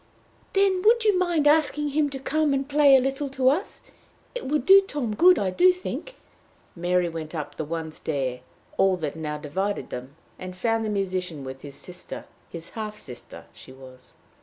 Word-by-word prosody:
"Then 390 -2 +3
would 455 +3 +4
you 420 -2 +4
mind 345 -5 +1
asking 295 -1 +3
him 290 +1 +1
to 275 - -6
come 295 +1 0
and 270 0 -2
play 290 -1 +6
a - - +7
little 270 +2 -2
to 265 -1 +2
us? 340 +10 -2 0.5
It - - -5
would 290 -1 0
do 390 +3 +9
Tom 285 - -3
good, 360 - +6
I 190 -2 0
do 365 - +5
think." 365 +7 -6 0.6
Mary 175 0 +1
went 165 -1 -6
up 150 -2 -5
the 155 - -4
one 160 0 -4
stair 135 -5 -3 0.4
all 190 -1 +3
that 155 -4 -4
now 150 -2 -4
divided 190 +7 -3
them, 130 +3 -7 0.2
and 185 0 -8
found 225 +3 0
the 215 - -2
musician 185 -6 -2
with 130 0 -8
his 140 -1 -9
sister 180 0 -6 0.2
his 170 -1 -9
half 215 -1 -6
sister 125 -10 -10
she - - -14
was. 130 -1 -15
210 Hz, 185 wpm, -25 LUFS, -, 0.6 s, do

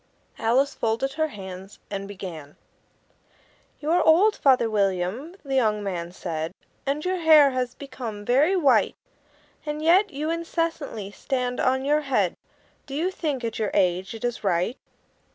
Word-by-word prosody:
Alice 255 +5 +2
folded 230 +5 -1
her 315 +1 0
hands, 190 -5 -9
and 195 -1 -4
began: 175 -7 -8 1.2
"You 305 +2 -2
are 350 +1 +4
old, 385 +7 +5
Father 260 -5 +4
William," 205 - -1
the 270 - -3
young 215 -5 +2
man 175 -3 -4
said, 165 -1 -4 0.3
"And 290 +4 -1
your 370 0 0
hair 310 -4 +6
has 250 -1 -2
become 240 -7 -7
very 290 - +3
white; 275 - +3 0.7
And 300 0 -4
yet 355 +6 +4
you 305 0 -3
incessantly 330 - -3
stand 250 +1 -2
on 260 +1 +1
your 300 +2 +3
head 275 -2 +1 0.5
Do 275 - -6
you 345 +5 0
think, 295 -8 -3
at 225 -1 -3
your 215 -2 0
age, 185 +1 +1
it 225 - -5
is 240 -1 -3
right?" 185 +4 +1
255 Hz, 150 wpm, -25 LUFS, 200-300 Hz, 1.2 s, hair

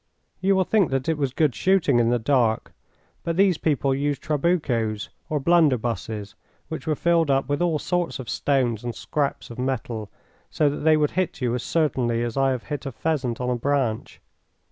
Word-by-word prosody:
You 195 +1 +2
will 190 - +3
think 195 -3 +2
that 135 -1 -1
it 160 - +2
was 140 -3 -1
good 145 0 +1
shooting 180 - +2
in 115 -1 +3
the 120 - +2
dark, 115 -2 +1 0.5
but 165 0 -2
these 190 -4 +3
people 140 -3 +1
used 140 +1 -1
trabucos, 140 - 0 0.2
or 155 -2 0
blunderbusses, 120 -9 +1 0.4
which 160 0 -6
were 155 - +1
filled 170 -1 +2
up 135 0 +2
with 145 +2 -1
all 170 -3 +2
sorts 175 +1 -1
of 130 -3 -8
stones 125 -6 0
and 120 -1 -4
scraps 140 -4 -3
of 115 - -9
metal, 120 -5 -3 0.4
so 150 -2 +2
that 145 - -4
they 155 0 +4
would 150 -1 +1
hit 185 -5 -1
you 125 -3 0
as 125 - -1
certainly 125 -8 0
as 120 -1 -3
I 135 0 +3
have 130 -3 -2
hit 145 -1 -5
a - - -4
pheasant 130 -4 -2
on 125 0 -1
a - - +1
branch. 125 -3 -1
140 Hz, 195 wpm, -24 LUFS, 120-160 Hz, 0.5 s, they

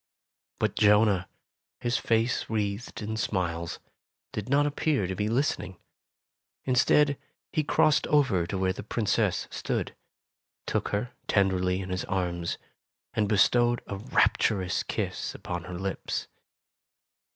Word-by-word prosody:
But - - 0
Jonah, 105 -3 +4 0.5
his 120 +1 0
face 115 +2 +1
wreathed 105 +1 -2
in 110 +1 -3
smiles, 85 -5 -2 0.6
did 105 +3 -4
not 145 +2 +4
appear 145 -6 +1
to 95 - -2
be 105 +3 -1
listening. 115 -6 -1 0.9
Instead, 140 +3 +3 0.3
he 155 - +2
crossed 150 0 +3
over 125 - +3
to 95 - -3
where 95 0 +1
the - - -7
Princess 105 -2 0
stood, - - -3 0.7
took - - -1
her 105 +5 -2 0.2
tenderly 95 -2 +2
in 95 -1 -6
his 90 - -1
arms 85 -2 -2 0.6
and 105 -2 +1
bestowed 120 +3 +3
a 100 - -5
rapturous 95 -2 +2
kiss - - -3
upon 85 -1 -5
her 90 - -6
lips. 95 +1 -3
105 Hz, 125 wpm, -28 LUFS, 95-120 Hz, 0.9 s, Jonah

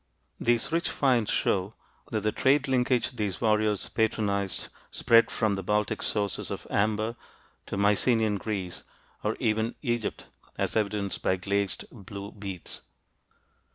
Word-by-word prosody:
These 120 +4 +2
rich 170 +1 +1
finds 125 -6 +2
show 95 +3 +1 0.3
that 110 -2 -1
the 105 +1 +1
trade 140 +4 +3
linkage 125 -1 +1
these 105 -4 -2
warriors 105 -2 +2
patronized 100 -3 0 0.2
spread 115 0 +4
from 110 -2 +1
the 95 - -2
Baltic 105 +2 0
sources 100 -2 -1
of - - -5
amber 110 +2 +1 0.5
to - - -3
Mycenean 105 +1 +3
Greece 95 -4 -4 0.4
or - - 0
even 110 +2 +1
Egypt, 120 -4 -2 0.3
as - - -1
evidenced 105 -2 -1
by 95 - +2
glazed 100 -1 -1
blue 100 -2 -8
beads. 100 -4 -7
105 Hz, 130 wpm, -28 LUFS, 100-115 Hz, 0.5 s, spread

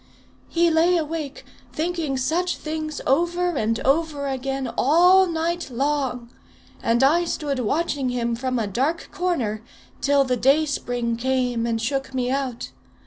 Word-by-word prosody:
He 340 0 +3
lay 335 +3 +4
awake, 310 -3 -4 0.3
thinking 320 -4 -2
such 345 +7 0
things 310 -1 -4
over 345 +5 +1
and 225 -2 0
over 290 0 +1
again, 270 0 -2
all 360 +6 +5
night 335 0 -2
long, 260 -2 -2 0.5
and 235 +2 +2
I 320 +6 +4
stood 290 -5 -2
watching 280 +2 0
him 235 -1 -1
from 255 +1 -2
a 225 - 0
dark 265 - -1
corner, 255 -13 -1 0.4
till 280 0 +4
the 255 -2 0
dayspring 245 -4 +1
came 250 -2 0
and 225 -1 0
shook 270 +3 -2
me 250 -1 0
out. 265 -3 -3
275 Hz, 140 wpm, -23 LUFS, 250-325 Hz, 0.5 s, all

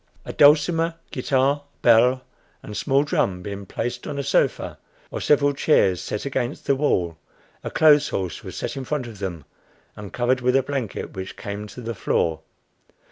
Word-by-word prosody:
A - - -6
dulcimer, 165 +3 +4 0.2
guitar, 135 +2 +1 0.2
bell, 125 +2 +5 0.4
and 105 - -8
small 135 +3 +2
drum 95 -10 -1
being 100 0 -6
placed 120 +4 -4
on 145 - -4
a 140 - -2
sofa - - 0 0.3
or - - -4
several 145 -1 +3
chairs 95 - +2
set 105 +5 -4
against 130 -3 -3
the 140 - +3
wall, 90 - 0 0.4
a - - -3
clothes 150 -2 +5
horse 95 -3 -4
was - - -8
set - - -4
in 135 - -4
front 140 0 -2
of 110 -4 -10
them 85 -7 -5 0.5
and 105 -2 -9
covered 125 +1 +1
with 125 +1 +2
a 135 - +4
blanket, 135 -6 -4
which 95 0 -7
came 105 0 -6
to 115 +5 -10
the 115 0 -4
floor. 80 -5 0
125 Hz, 175 wpm, -23 LUFS, 100-140 Hz, 0.5 s, bell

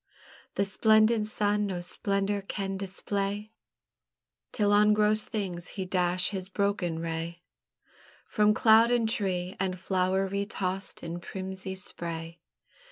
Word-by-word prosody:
The 200 - +2
splendent 215 +2 +4
sun 210 -1 +1
no 185 -3 -3
splendour 200 +3 -1
can 195 0 -4
display, 200 +2 -3 1.0
Till 205 -2 +2
on 210 +1 +5
gross 215 0 +3
things 180 -5 -4
he 190 - -2
dash 180 0 +1
his 190 -2 -4
broken 200 -4 0
ray, 165 +1 -4 0.8
From 210 -1 +3
cloud 225 +1 +6
and 240 -2 +2
tree 190 -5 -1
and 185 -1 -1
flower 185 +1 +1
re 200 +1 -2
tossed 190 -2 -4
in 170 +1 -4
prismy 190 +1 -5
spray. 170 -2 -6
195 Hz, 125 wpm, -29 LUFS, 180-210 Hz, 1.0 s, cloud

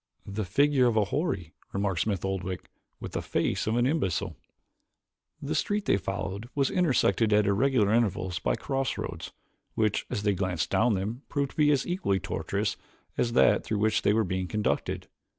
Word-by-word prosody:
"The 100 +1 -3
figure 135 +6 +3
of 115 -2 +1
a 105 - +4
houri," 100 - -2 0.2
remarked 100 -3 0
Smith 100 -3 -1
Oldwick, 95 -1 -3 0.3
"with - - -7
the - - -2
face - - -1
of 110 - +1
an 120 0 +3
imbecile." 100 - 0 1.0
The - - -3
street 205 - 0
they 100 - +3
followed 100 +3 -4
was 140 -2 +1
intersected 130 - +2
at 105 0 +4
irregular 110 +1 +3
intervals 100 -6 +1
by - - 0
crossroads 135 -2 -3 0.4
which, 110 -2 0
as 110 -5 -3
they 105 -1 +3
glanced 90 -3 -1
down 115 -2 +3
them, 105 +7 -3
proved 140 -2 -1
to - - -21
be 150 -1 +5
equally 175 - 0
as - - -7
tortuous - - -2 0.4
as 115 -1 0
that - - +4
through 110 - -2
which 105 +1 +2
they - - +3
were 110 +1 +3
being 95 -1 -2
conducted. 105 +4 -1
105 Hz, 175 wpm, -28 LUFS, 95-125 Hz, 1.0 s, be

